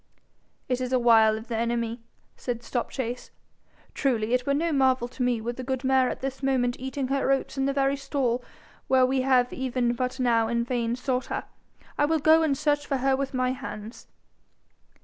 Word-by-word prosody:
'It 255 0 -1
is 255 0 -3
a 260 - +4
wile 225 -3 +5
of 220 +2 -9
the 235 - -3
enemy,' 235 0 -1 0.3
said 240 -2 -4
Stopchase. 245 0 -4 0.6
'Truly, 235 -4 0
it 250 +1 +1
were 280 - +3
no 330 +3 0
marvel 260 -4 +2
to 250 +1 -9
me 245 -2 +1
were 235 +2 -3
the 255 - -7
good 260 0 -3
mare 260 -1 +3
at - - -5
this 270 0 -4
moment 255 -3 +1
eating 265 0 -3
her 275 -1 0
oats 270 0 0
in 270 -1 0
the 275 - +1
very 275 0 +1
stall 265 -3 -1 0.4
where 260 -1 +5
we 260 +1 +1
have 255 -1 +2
even 250 -2 0
but 255 +2 -3
now 230 -3 +2
in 235 +1 0
vain 235 -1 -1
sought 250 0 -2
her. - - -3 0.6
I 290 - +5
will 320 +2 +2
go 315 +2 +5
and 295 -4 +1
search 290 0 +1
for 275 - 0
her 265 +1 +2
with 275 0 -3
my 255 0 +1
hands.' 235 -4 -8
255 Hz, 200 wpm, -26 LUFS, 240-270 Hz, 0.6 s, wile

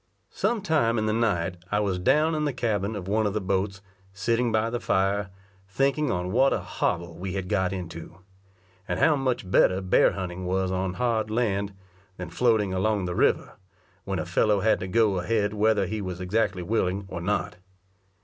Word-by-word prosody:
Some 230 -4 -1
time 150 - +2
in 110 - 0
the 110 - +1
night 95 -6 0
I 105 - +2
was 100 -3 0
down 150 - +3
in 155 -1 0
the 145 - -1
cabin 110 -4 -1
of 95 -3 -6
one 105 +2 +1
of 100 - -3
the - - +1
boats, 95 0 -2 0.3
sitting 115 +4 0
by 110 +1 +1
the 120 - -2
fire, 100 +1 0 0.4
thinking 140 +6 +1
on 90 0 -2
what 130 +5 +4
a - - 0
hobble 85 -1 -3
we 95 0 -4
had 95 -2 -3
got 95 -2 +1
into; 85 -2 -7 0.7
and - - -2
how 160 -2 +4
much 130 -8 -2
better 95 0 +4
bear 95 -1 +3
hunting 90 -1 -5
was 95 0 0
on 95 0 -2
hard 115 -3 0
land, 100 -3 -1 0.4
than 90 - -7
floating 110 -6 +2
along 105 +2 +1
on - - -3
the 90 - -2
water, - - +2 0.5
when 95 -1 -3
a 80 - -2
fellow 100 +3 +2
had 110 +2 +3
to 95 - -4
go 105 -1 +2
ahead 105 +2 0
whether 105 -1 +2
he 105 +3 -3
was 90 -2 -5
exactly 95 -1 0
willing 100 -1 -1
or 90 -3 -6
not. 95 -1 -1
100 Hz, 195 wpm, -26 LUFS, 95-115 Hz, 0.7 s, what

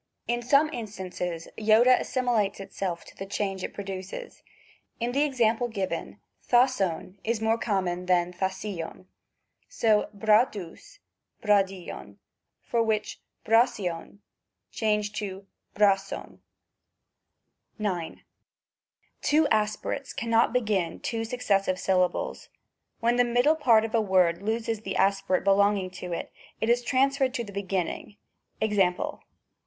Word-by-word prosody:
In 240 0 0
some 280 +5 +3
instances 185 - -5
Iota 225 +4 +5
as - - -5
similates 240 -7 0
itself 195 -3 -4
to - - -15
the 195 - -7
change 195 -2 -2
it - - -3
produces; 195 - -7 0.6
in 240 +1 -1
the 275 +3 +1
exam 240 -6 +2
ple 245 - -1
given 195 -5 -4 0.3
S 255 +1 +4
aOGcov 185 +1 -2
is 230 0 0
more 225 +1 +1
common 180 -5 -1
than 180 -1 +2
^ccaicjv. 190 -1 -4 0.6
So 215 -2 +2
j3gdSvgy 215 - +1 0.5
/SgaSicDVy 195 -3 0 0.5
for 235 - 0
which 220 -2 -1 0.2
^qaoicov 215 -7 +1 0.5
changed 210 -1 0
to 195 -2 -5 0.3
^qdcocov. 195 -1 +1 1.4
9. 185 -7 -3 1.0
Two 300 +1 +3
aspirates 215 +6 -1
cannot 230 0 +2
begin 210 -9 0
two 225 -1 -3
successive 200 -6 0
sylla 185 -1 +3
bles; - - -6 0.5
when 235 +1 +2
the 245 - +5
middle 245 +6 +3
part 235 -8 +4
of 225 - -6
a 230 - +3
word 185 -4 +2
loses 225 +1 -2
the 195 -3 -4
aspi 195 0 +1
rate 185 - +2
belonging 200 -1 +3
to 180 -1 -7
it, 170 - -4 0.3
it 220 - 0
is 240 +1 +3
transferred 270 +1 +1
to 235 - -1
the 200 -3 -10
beginning; 195 +1 -3 0.4
Ex.? 220 -1 0
210 Hz, 125 wpm, -27 LUFS, 190-235 Hz, 1.4 s, Iota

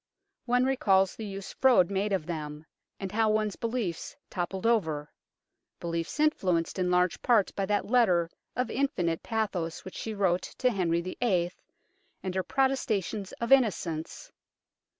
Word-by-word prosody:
One 250 +1 +3
recalls 195 -8 +3
the 220 - -6
use 195 -1 -7
Froude 220 -9 +4
made 200 +2 0
of 185 -6 0
them, 155 -2 -5 0.3
and 195 -2 -4
how 220 0 +2
one's 215 -1 +1
beliefs 225 -8 -3 0.2
toppled 185 +3 -3
over 160 -11 +1 0.7
beliefs 170 - -3
influenced 190 - +1
in 180 -1 +1
large 180 0 +2
part 225 -6 +3
by 195 -1 -1
that 205 0 +1
letter 200 -8 +3 0.3
of 250 -1 -1
infinite 180 - 0
pathos 195 -7 -2
which 185 - -8
she 220 -1 -4
wrote 185 -3 +2 0.2
to 255 -1 +2
Henry 170 -5 +1
VIII., 185 -1 0 0.7
and 185 - -3
her 190 - +1
protestations 220 -6 0
of 235 +1 -4
innocence. 205 - +1
195 Hz, 145 wpm, -29 LUFS, 175-230 Hz, 0.7 s, Froude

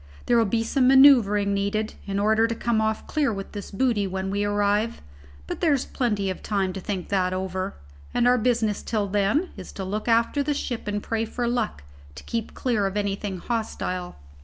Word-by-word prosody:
There'll 235 -1 +4
be 225 +2 0
some 255 +2 +2
man[oe]uvring 245 -7 +6
needed 200 +2 -1
in 195 0 -2
order 220 +2 +3
to 230 - -3
come 230 -1 0
off 220 0 -1
clear 295 -5 0
with 195 -2 -6
this 205 -2 -7
booty 215 -2 +1
when 190 0 -3
we 200 +1 0
arrive: 205 +2 +1 0.5
but - - -5
there's 285 -6 +2
plenty 210 -6 -1
of 185 - -7
time 195 -3 -1
to 190 - -5
think 185 -2 -4
that 185 -2 +1
over, 190 +1 -3 0.4
and 245 - +2
our 250 0 +4
business 225 -3 +1
till 215 -3 -1
then 205 - +1
is 190 - -8
to 195 - -5
look 205 +4 -3
after 230 +5 +3
the 290 +1 0
ship 240 -6 -4
and 205 0 -2
pray 225 0 -1
for 240 +2 -3
luck 235 - -1 0.3
to - - -10
keep 230 -2 -4
clear 220 -6 0
of 195 +2 -4
anything 200 -1 -2
hostile." 185 -4 -3
210 Hz, 195 wpm, -25 LUFS, 195-235 Hz, 0.5 s, man[oe]uvring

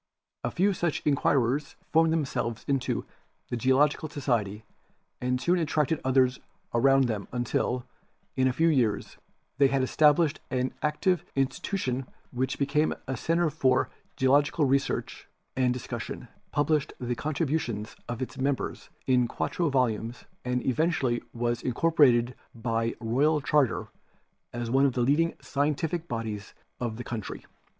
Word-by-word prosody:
A 120 - 0
few 195 - +2
such 170 -3 -1
inquirers 140 -1 +1 0.2
formed 160 0 +4
themselves 130 -7 -1
into 130 -5 0 0.4
the - - -1
Geological 135 +6 +2
Society 110 -8 -1 0.6
and 125 0 0
soon 175 +6 +2
attracted 155 -1 0
others 130 -1 +3 0.3
around 135 +3 +5
them 110 -5 -2
until, 125 0 -1 0.5
in 130 -1 +3
a - - +3
few 160 +6 +2
years, 125 -10 +1 0.4
they 140 - +7
had 135 -1 +1
estab 150 +3 +5
lished 155 -2 +1
an 130 0 -1
active 170 +4 +1
institution 135 -1 -1 0.2
which 130 +1 -1
became 150 +2 +1
a 130 - -3
center 165 +5 +1
for 130 -3 +2 0.2
geological 145 +3 +3
research 135 +1 -1 0.3
and 130 -1 +2
discussion, 120 -3 -5 0.2
published 150 0 +1
the 125 -1 -2
contribu 155 +2 0
tions 110 -5 -5
of 120 +1 -2
its 130 +1 -8
members 135 0 -2 0.2
in 125 -2 +3
quarto 170 +7 -1
volumes 120 -3 0 0.2
and 125 0 -1
eventually 130 -3 +1
was 120 0 -1
incorporated 125 -3 +3 0.2
by 115 0 -1
royal 135 +7 +2
charter 145 -1 +1 0.6
as 120 -1 -4
one 135 +2 +5
of 130 - -1
the 125 - 0
leading 150 +7 +3
scien 145 +2 -1
tific 165 +2 -3
bodies 110 -5 -5 0.2
of 115 -3 -3
the 120 - -5
country. 115 -5 -6
130 Hz, 140 wpm, -28 LUFS, 120-150 Hz, 0.6 s, they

